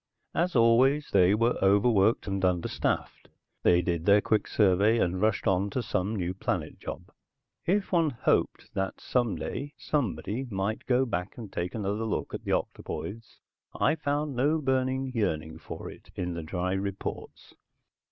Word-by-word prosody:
As 175 -1 0
always, 130 +5 +4
they 95 0 +5
were 115 +2 +1
overworked 100 +2 +4
and 95 -1 -2
understaffed, 90 -2 -1 0.3
they 90 0 +4
did 85 0 -2
their 100 +1 +7
quick 110 +1 +1
survey 105 +2 +3
and 90 -3 0
rushed 110 -1 +1
on 95 +1 +2
to 125 +4 -2
some 100 +1 -1
new 90 -2 -2
planet 95 - -3
job. - - -7 0.6
If 195 +3 +1
one 165 -4 +3
hoped 120 - 0
that 95 0 -2
someday 125 +4 -2
somebody 125 -3 -2
might 100 +1 -2
go 130 +1 +3
back 90 -5 -4
and 110 -5 -9
take 90 +4 -3
another 105 +1 -2
look 110 - -3
at - - -5
the - - -2
octopoids 115 +3 -4 0.4
I - - +4
found 145 -2 -2
no 145 +6 +2
burning 130 -2 0
yearning 80 -8 -1
for - - -8
it - - -16
in 90 -1 -3
the 85 - -4
dry 90 +3 -2
reports. 95 0 -5
105 Hz, 155 wpm, -28 LUFS, 95-130 Hz, 0.6 s, their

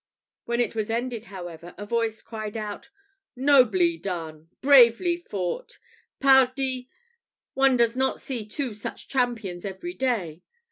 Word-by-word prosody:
When 235 0 -1
it 240 - +1
was 220 -1 -2
ended, 235 0 -2
however, 175 -4 -9
a 205 - -6
voice 225 0 -1
cried 215 -1 -6
out, 210 -2 -6 0.5
"Nobly 230 - +4
done! 165 -3 -6
bravely 275 +5 +6
fought! 210 - -5 0.4
Pardie, 265 -1 +3 0.6
one 270 -1 +4
does 235 0 +2
not 265 +1 0
see 250 -5 -4
two 240 +3 -4
such 210 - -7
champions 230 -9 -1
every 200 - -6
day!" 205 - -2
230 Hz, 130 wpm, -25 LUFS, 195-260 Hz, 0.6 s, bravely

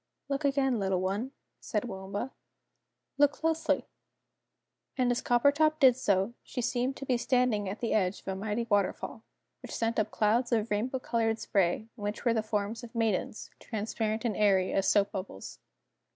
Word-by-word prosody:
"Look 275 +2 -1
again, 270 -4 +2
little 190 -2 +1
one," 200 +8 -2 0.3
said 210 - -2
Waomba. 200 +3 -5 0.9
"Look 290 0 +5
closely!" 320 0 0 1.1
And 250 -2 +2
as 245 - 0
Coppertop 285 +5 +3
did 260 -4 +7
so, 200 -3 +1
she - - -7
seemed 250 +2 0
to 275 - -6
be 255 -2 +2
standing 235 -5 +1
at 200 - -6
the 235 - 0
edge 190 -2 +1
of - - -31
a 190 - -1
mighty 210 +4 -2
waterfall, 205 -3 0 0.4
which - - -7
sent 230 0 0
up 215 0 +1
clouds 230 +4 +1
of 225 -1 +1
rainbow 235 +6 0
coloured 230 -3 0
spray, 195 0 0
in 210 - -10
which 205 +4 -4
were 235 - +4
the 225 - +1
forms 215 +2 -2
of 240 0 -11
Maidens, 220 -2 -1
transparent 220 +1 -3
and 220 -4 0
airy 195 -3 +3
as 195 - +1
soap 205 -1 +3
bubbles. 190 - -7
225 Hz, 170 wpm, -30 LUFS, 205-250 Hz, 1.1 s, did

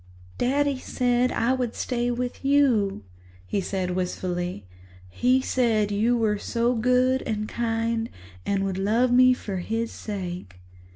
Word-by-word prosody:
"Daddy 275 +2 +1
said 245 -1 +1
that - - -4
I 240 +3 +2
would 250 -3 -2
stay 245 -1 -1
with 245 +2 -3
you," 250 - +2 0.4
he 195 - -1
said 185 -1 -2
wistfully. 180 - -3 0.4
"He 250 - +2
said 225 -6 +1
you 225 +4 +2
were 215 -3 +1
so 235 +3 0
good 250 +2 +2
and 215 -1 -2
kind 230 0 -1 0.3
and 195 -1 0
would 190 -1 -2
love 230 +6 +2
me 255 +1 +6
for 200 -5 -5
his 225 +5 -2
sake." 180 - -6
230 Hz, 140 wpm, -25 LUFS, 195-250 Hz, 0.4 s, me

